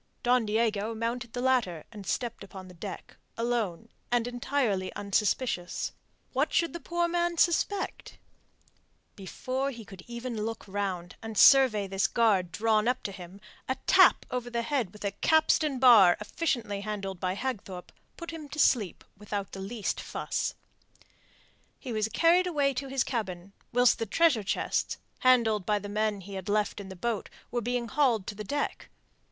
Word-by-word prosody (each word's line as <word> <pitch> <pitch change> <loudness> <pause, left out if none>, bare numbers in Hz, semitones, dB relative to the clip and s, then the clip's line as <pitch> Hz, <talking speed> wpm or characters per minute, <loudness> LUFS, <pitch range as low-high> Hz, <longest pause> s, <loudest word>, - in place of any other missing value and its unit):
Don 245 -2 +3
Diego 220 0 0
mounted 235 +1 -3
the 245 - -3
ladder 235 -12 +1
and 205 -4 -10
stepped 235 -4 -2
upon 190 -1 -10
the 180 - -12
deck, 170 - -8 0.2
alone, 230 -4 -1 0.2
and 240 -1 +2
entirely 245 -6 -1
unsuspicious. 200 -1 -1 0.4
What - - +1
should 335 -1 +1
the 340 - -5
poor 345 0 -1
man 345 0 0
suspect? 350 +4 0 1.0
Before 255 +8 -3
he 235 -5 -9
could 190 -3 -11
even 235 -2 -4
look 225 0 -5
round, 190 -3 -3
and 225 -1 -7
survey 255 -7 +7
this 195 0 0
guard 200 -7 +2
drawn 215 +3 +2
up 250 +1 0
to 200 - -3
receive 195 - -10
him, 190 +3 -15 0.3
a 260 - +1
tap 375 -1 +6
over 245 -1 -3
the 235 -1 -2
head 255 -8 -1
with 210 0 -9
a 200 - 0
capstan 310 +4 +2
bar 230 -9 +7
efficiently 210 -3 -2
handled 200 -3 -4
by 185 0 -1
Hagthorpe 200 -7 -5 0.3
put 335 -1 -7
him 310 -3 -8
to 285 - -8
sleep 220 - +2
without 205 -1 -5
the 195 - -7
least 210 +2 -3
fuss. - - -3 1.2
He 255 -4 -6
was 215 -1 0
carried 335 - +3
away 285 -5 +1
to 270 +2 -4
his 270 -1 0
cabin, 195 -6 -4 0.2
whilst 245 0 +4
the 225 - -2
treasure 310 - +3
chests, 195 - -1 0.2
handled 230 -5 +4
by 210 +3 +1
the 205 0 -6
men 210 -1 -1
he 200 +2 -10
had 190 0 -6
left 210 0 0
in 195 -1 -8
the 190 - -8
boat, 220 +3 -3 0.2
were 240 0 -1
being 245 +1 -2
hauled 240 -8 +2
to - - -5
the 210 +1 -7
deck. 285 +8 -3
225 Hz, 170 wpm, -29 LUFS, 200-255 Hz, 1.2 s, survey